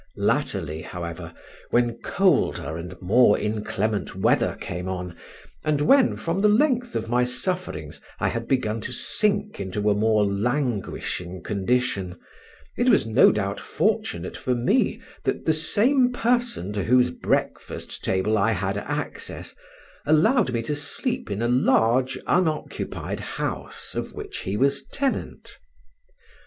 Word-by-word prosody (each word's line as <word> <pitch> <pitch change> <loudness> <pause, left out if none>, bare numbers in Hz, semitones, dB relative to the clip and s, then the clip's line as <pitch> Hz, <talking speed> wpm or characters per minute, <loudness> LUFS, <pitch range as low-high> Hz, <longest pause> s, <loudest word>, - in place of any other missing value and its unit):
Latterly, 80 +2 0
however, 85 -2 -6 0.4
when 120 -1 +1
colder 180 - +1
and 90 +2 -7
more 105 +3 +5
inclement 105 -1 -2
weather - - +2
came 90 +1 -5
on, 90 -2 -5 0.5
and 155 -2 +1
when, 265 - +4
from 170 +4 -2
the 210 - +5
length 245 +1 +2
of 115 0 -2
my 125 +2 +2
sufferings, 125 - -3 0.2
I - - +1
had 115 0 -4
begun 115 -5 0
to 125 - -5
sink 205 - +1
into 105 +2 0
a - - +4
more 105 0 +3
languishing 100 - -2
condition, 100 -3 -1 0.6
it - - +3
was - - +4
no 115 +3 +6
doubt 100 -2 -2
fortunate 85 +1 -1
for 125 - -1
me 120 +1 +1 0.2
that - - -2
the 160 - +3
same 245 - +3
person 240 - 0
to 100 -2 -1
whose 125 +1 +4
breakfast - - -3
table 105 +3 +1
I 115 +3 +3
had 95 +1 -1
access, - - -5 0.5
allowed 155 - +4
me 115 -1 -1
to 145 +6 -2
sleep 190 - -2
in 100 +3 -2
a - - +2
large 125 +1 +3
unoccupied 160 -4 -1
house - - -5
of - - -4
which - - -7
he 95 +2 -3
was 140 +2 +2
tenant. 275 - -3
120 Hz, 135 wpm, -24 LUFS, 100-155 Hz, 0.6 s, no